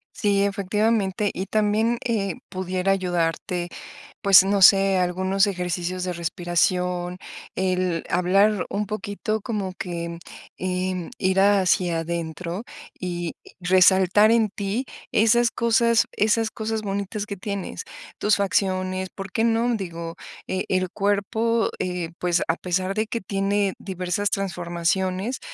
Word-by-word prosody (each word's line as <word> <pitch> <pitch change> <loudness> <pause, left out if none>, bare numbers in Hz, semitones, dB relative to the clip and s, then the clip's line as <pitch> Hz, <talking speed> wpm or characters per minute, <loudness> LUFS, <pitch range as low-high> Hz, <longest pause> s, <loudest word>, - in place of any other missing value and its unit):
Sí, 200 -1 +2
efectivamente, 200 0 0
y 190 - -3
también, 215 +3 +1
eh, 200 -6 -1
pudiera 185 0 -1
ayudarte, 175 -1 -1 0.5
pues, 195 -1 +8
no 200 0 +1
sé, 195 0 +7
algunos 185 +2 +1
ejercicios 180 -1 -2
de 180 - -2
respiración, 175 +1 -1 0.4
el 185 -2 0
hablar 195 +3 +3
un 210 +1 -2
poquito 215 +1 -3
como 200 -4 -3
que, 170 -2 -4
mm, 170 - -7 0.4
em, 185 -1 -2
ir 190 0 +1
hacia 185 -4 +3
adentro 170 +3 -4 0.3
y 175 -2 -4 0.2
resaltar 190 +3 +5
en 225 -2 +3
ti 205 +5 -3 0.3
esas 235 +2 +4
cosas 235 0 +3
esas 220 +1 +1
cosas 220 0 -3
bonitas 200 +1 -3
que 205 - -5
tienes, 200 0 -5 0.3
tus 210 +1 +2
facciones, 185 -1 0
¿por 195 -1 -7
qué 225 - 0
non? 230 +1 +2
Digo, 170 -4 -5 0.3
e 185 0 -1
el 185 -1 +1
cuerpo, 215 +4 0
eh, 180 -2 -3
pues, 175 -1 +1
a 165 - +2
pesar 185 +2 -1
de 215 +1 -1
que 230 - -3
tiene 195 +1 0
diversas 185 +1 -2
transformaciones, 185 +4 -1
190 Hz, 125 wpm, -24 LUFS, 180-205 Hz, 0.5 s, pues